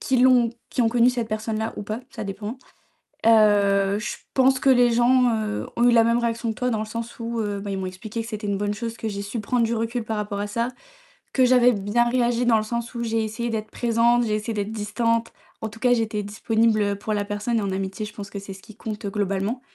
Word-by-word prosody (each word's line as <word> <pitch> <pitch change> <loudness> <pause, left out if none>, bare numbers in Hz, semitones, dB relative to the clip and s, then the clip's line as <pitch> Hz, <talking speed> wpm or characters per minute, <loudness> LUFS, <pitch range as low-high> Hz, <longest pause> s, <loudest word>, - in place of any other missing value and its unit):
qui 260 -2 +1
l'ont 250 -2 +5 0.2
qui 245 - +1
ont 225 - +3
connu 240 +1 +4
cette 235 -3 -3
personne-là 220 +1 -2
ou - - -4
pas, 215 +3 -4
ça - - -7
dépend. 205 +5 -5 0.7
Heu, 205 -2 +4
je - - -4 0.2
pense 265 0 +4
que 275 - +2
les 245 -2 +5
gens, 245 +1 +4
heu, 215 -1 -3
ont 235 - +1
eu - - +5
la 230 -1 +6
même 235 +1 +3
réaction 235 -1 -1
que 220 - -3
toi 250 - +1
dans 220 -3 -1
le 215 - -2
sens 230 +2 -6
où, 230 0 -3
heu, 205 -2 -2
ben, 200 0 -5
ils 195 - -2
m'ont 190 - -3
expliqué 210 +5 -6
que 225 - -7
c'était 215 -2 -5
une 200 -1 0
bonne 205 0 -1
chose 230 +1 -5
que 225 - -4
j'ai 200 0 -4
su 200 +4 -4
prendre 240 +3 +1
du 235 - -1
recul 230 +1 -2
par 220 0 -3
rapport 205 -1 -3
à 205 - -2
ça, 230 +3 -1 0.7
que 260 - +4
j'avais 250 -1 +5
bien 210 +3 +1
réagi 240 0 +1
dans 230 -2 +5
le 215 - +1
sens 235 +2 -4
où 235 - -3
j'ai 225 -1 0
essayé 235 +2 -3
d'être 215 -1 -3
présente, 235 0 +2
j'ai 215 -1 0
essayé 215 +1 -3
d'être 205 +1 -3
distante. 230 +2 -1 0.3
En 220 - -2
tout 225 - -13
cas, 250 0 +3
j'étais 220 -3 -1
disponible, 220 +2 +1
heu, 200 0 0
pour 215 +2 -4
la 205 -1 0
personne 210 +3 -1
et 215 - -1
en 195 - -1
amitié 195 +2 -3
je 210 - -11
pense 200 -1 -8
que 200 - -6
c'est 195 -1 -8
ce 190 - -14
qui 220 -2 -14
compte 210 -2 -6
globalement. 200 +4 -1
225 Hz, 260 wpm, -24 LUFS, 205-235 Hz, 0.7 s, la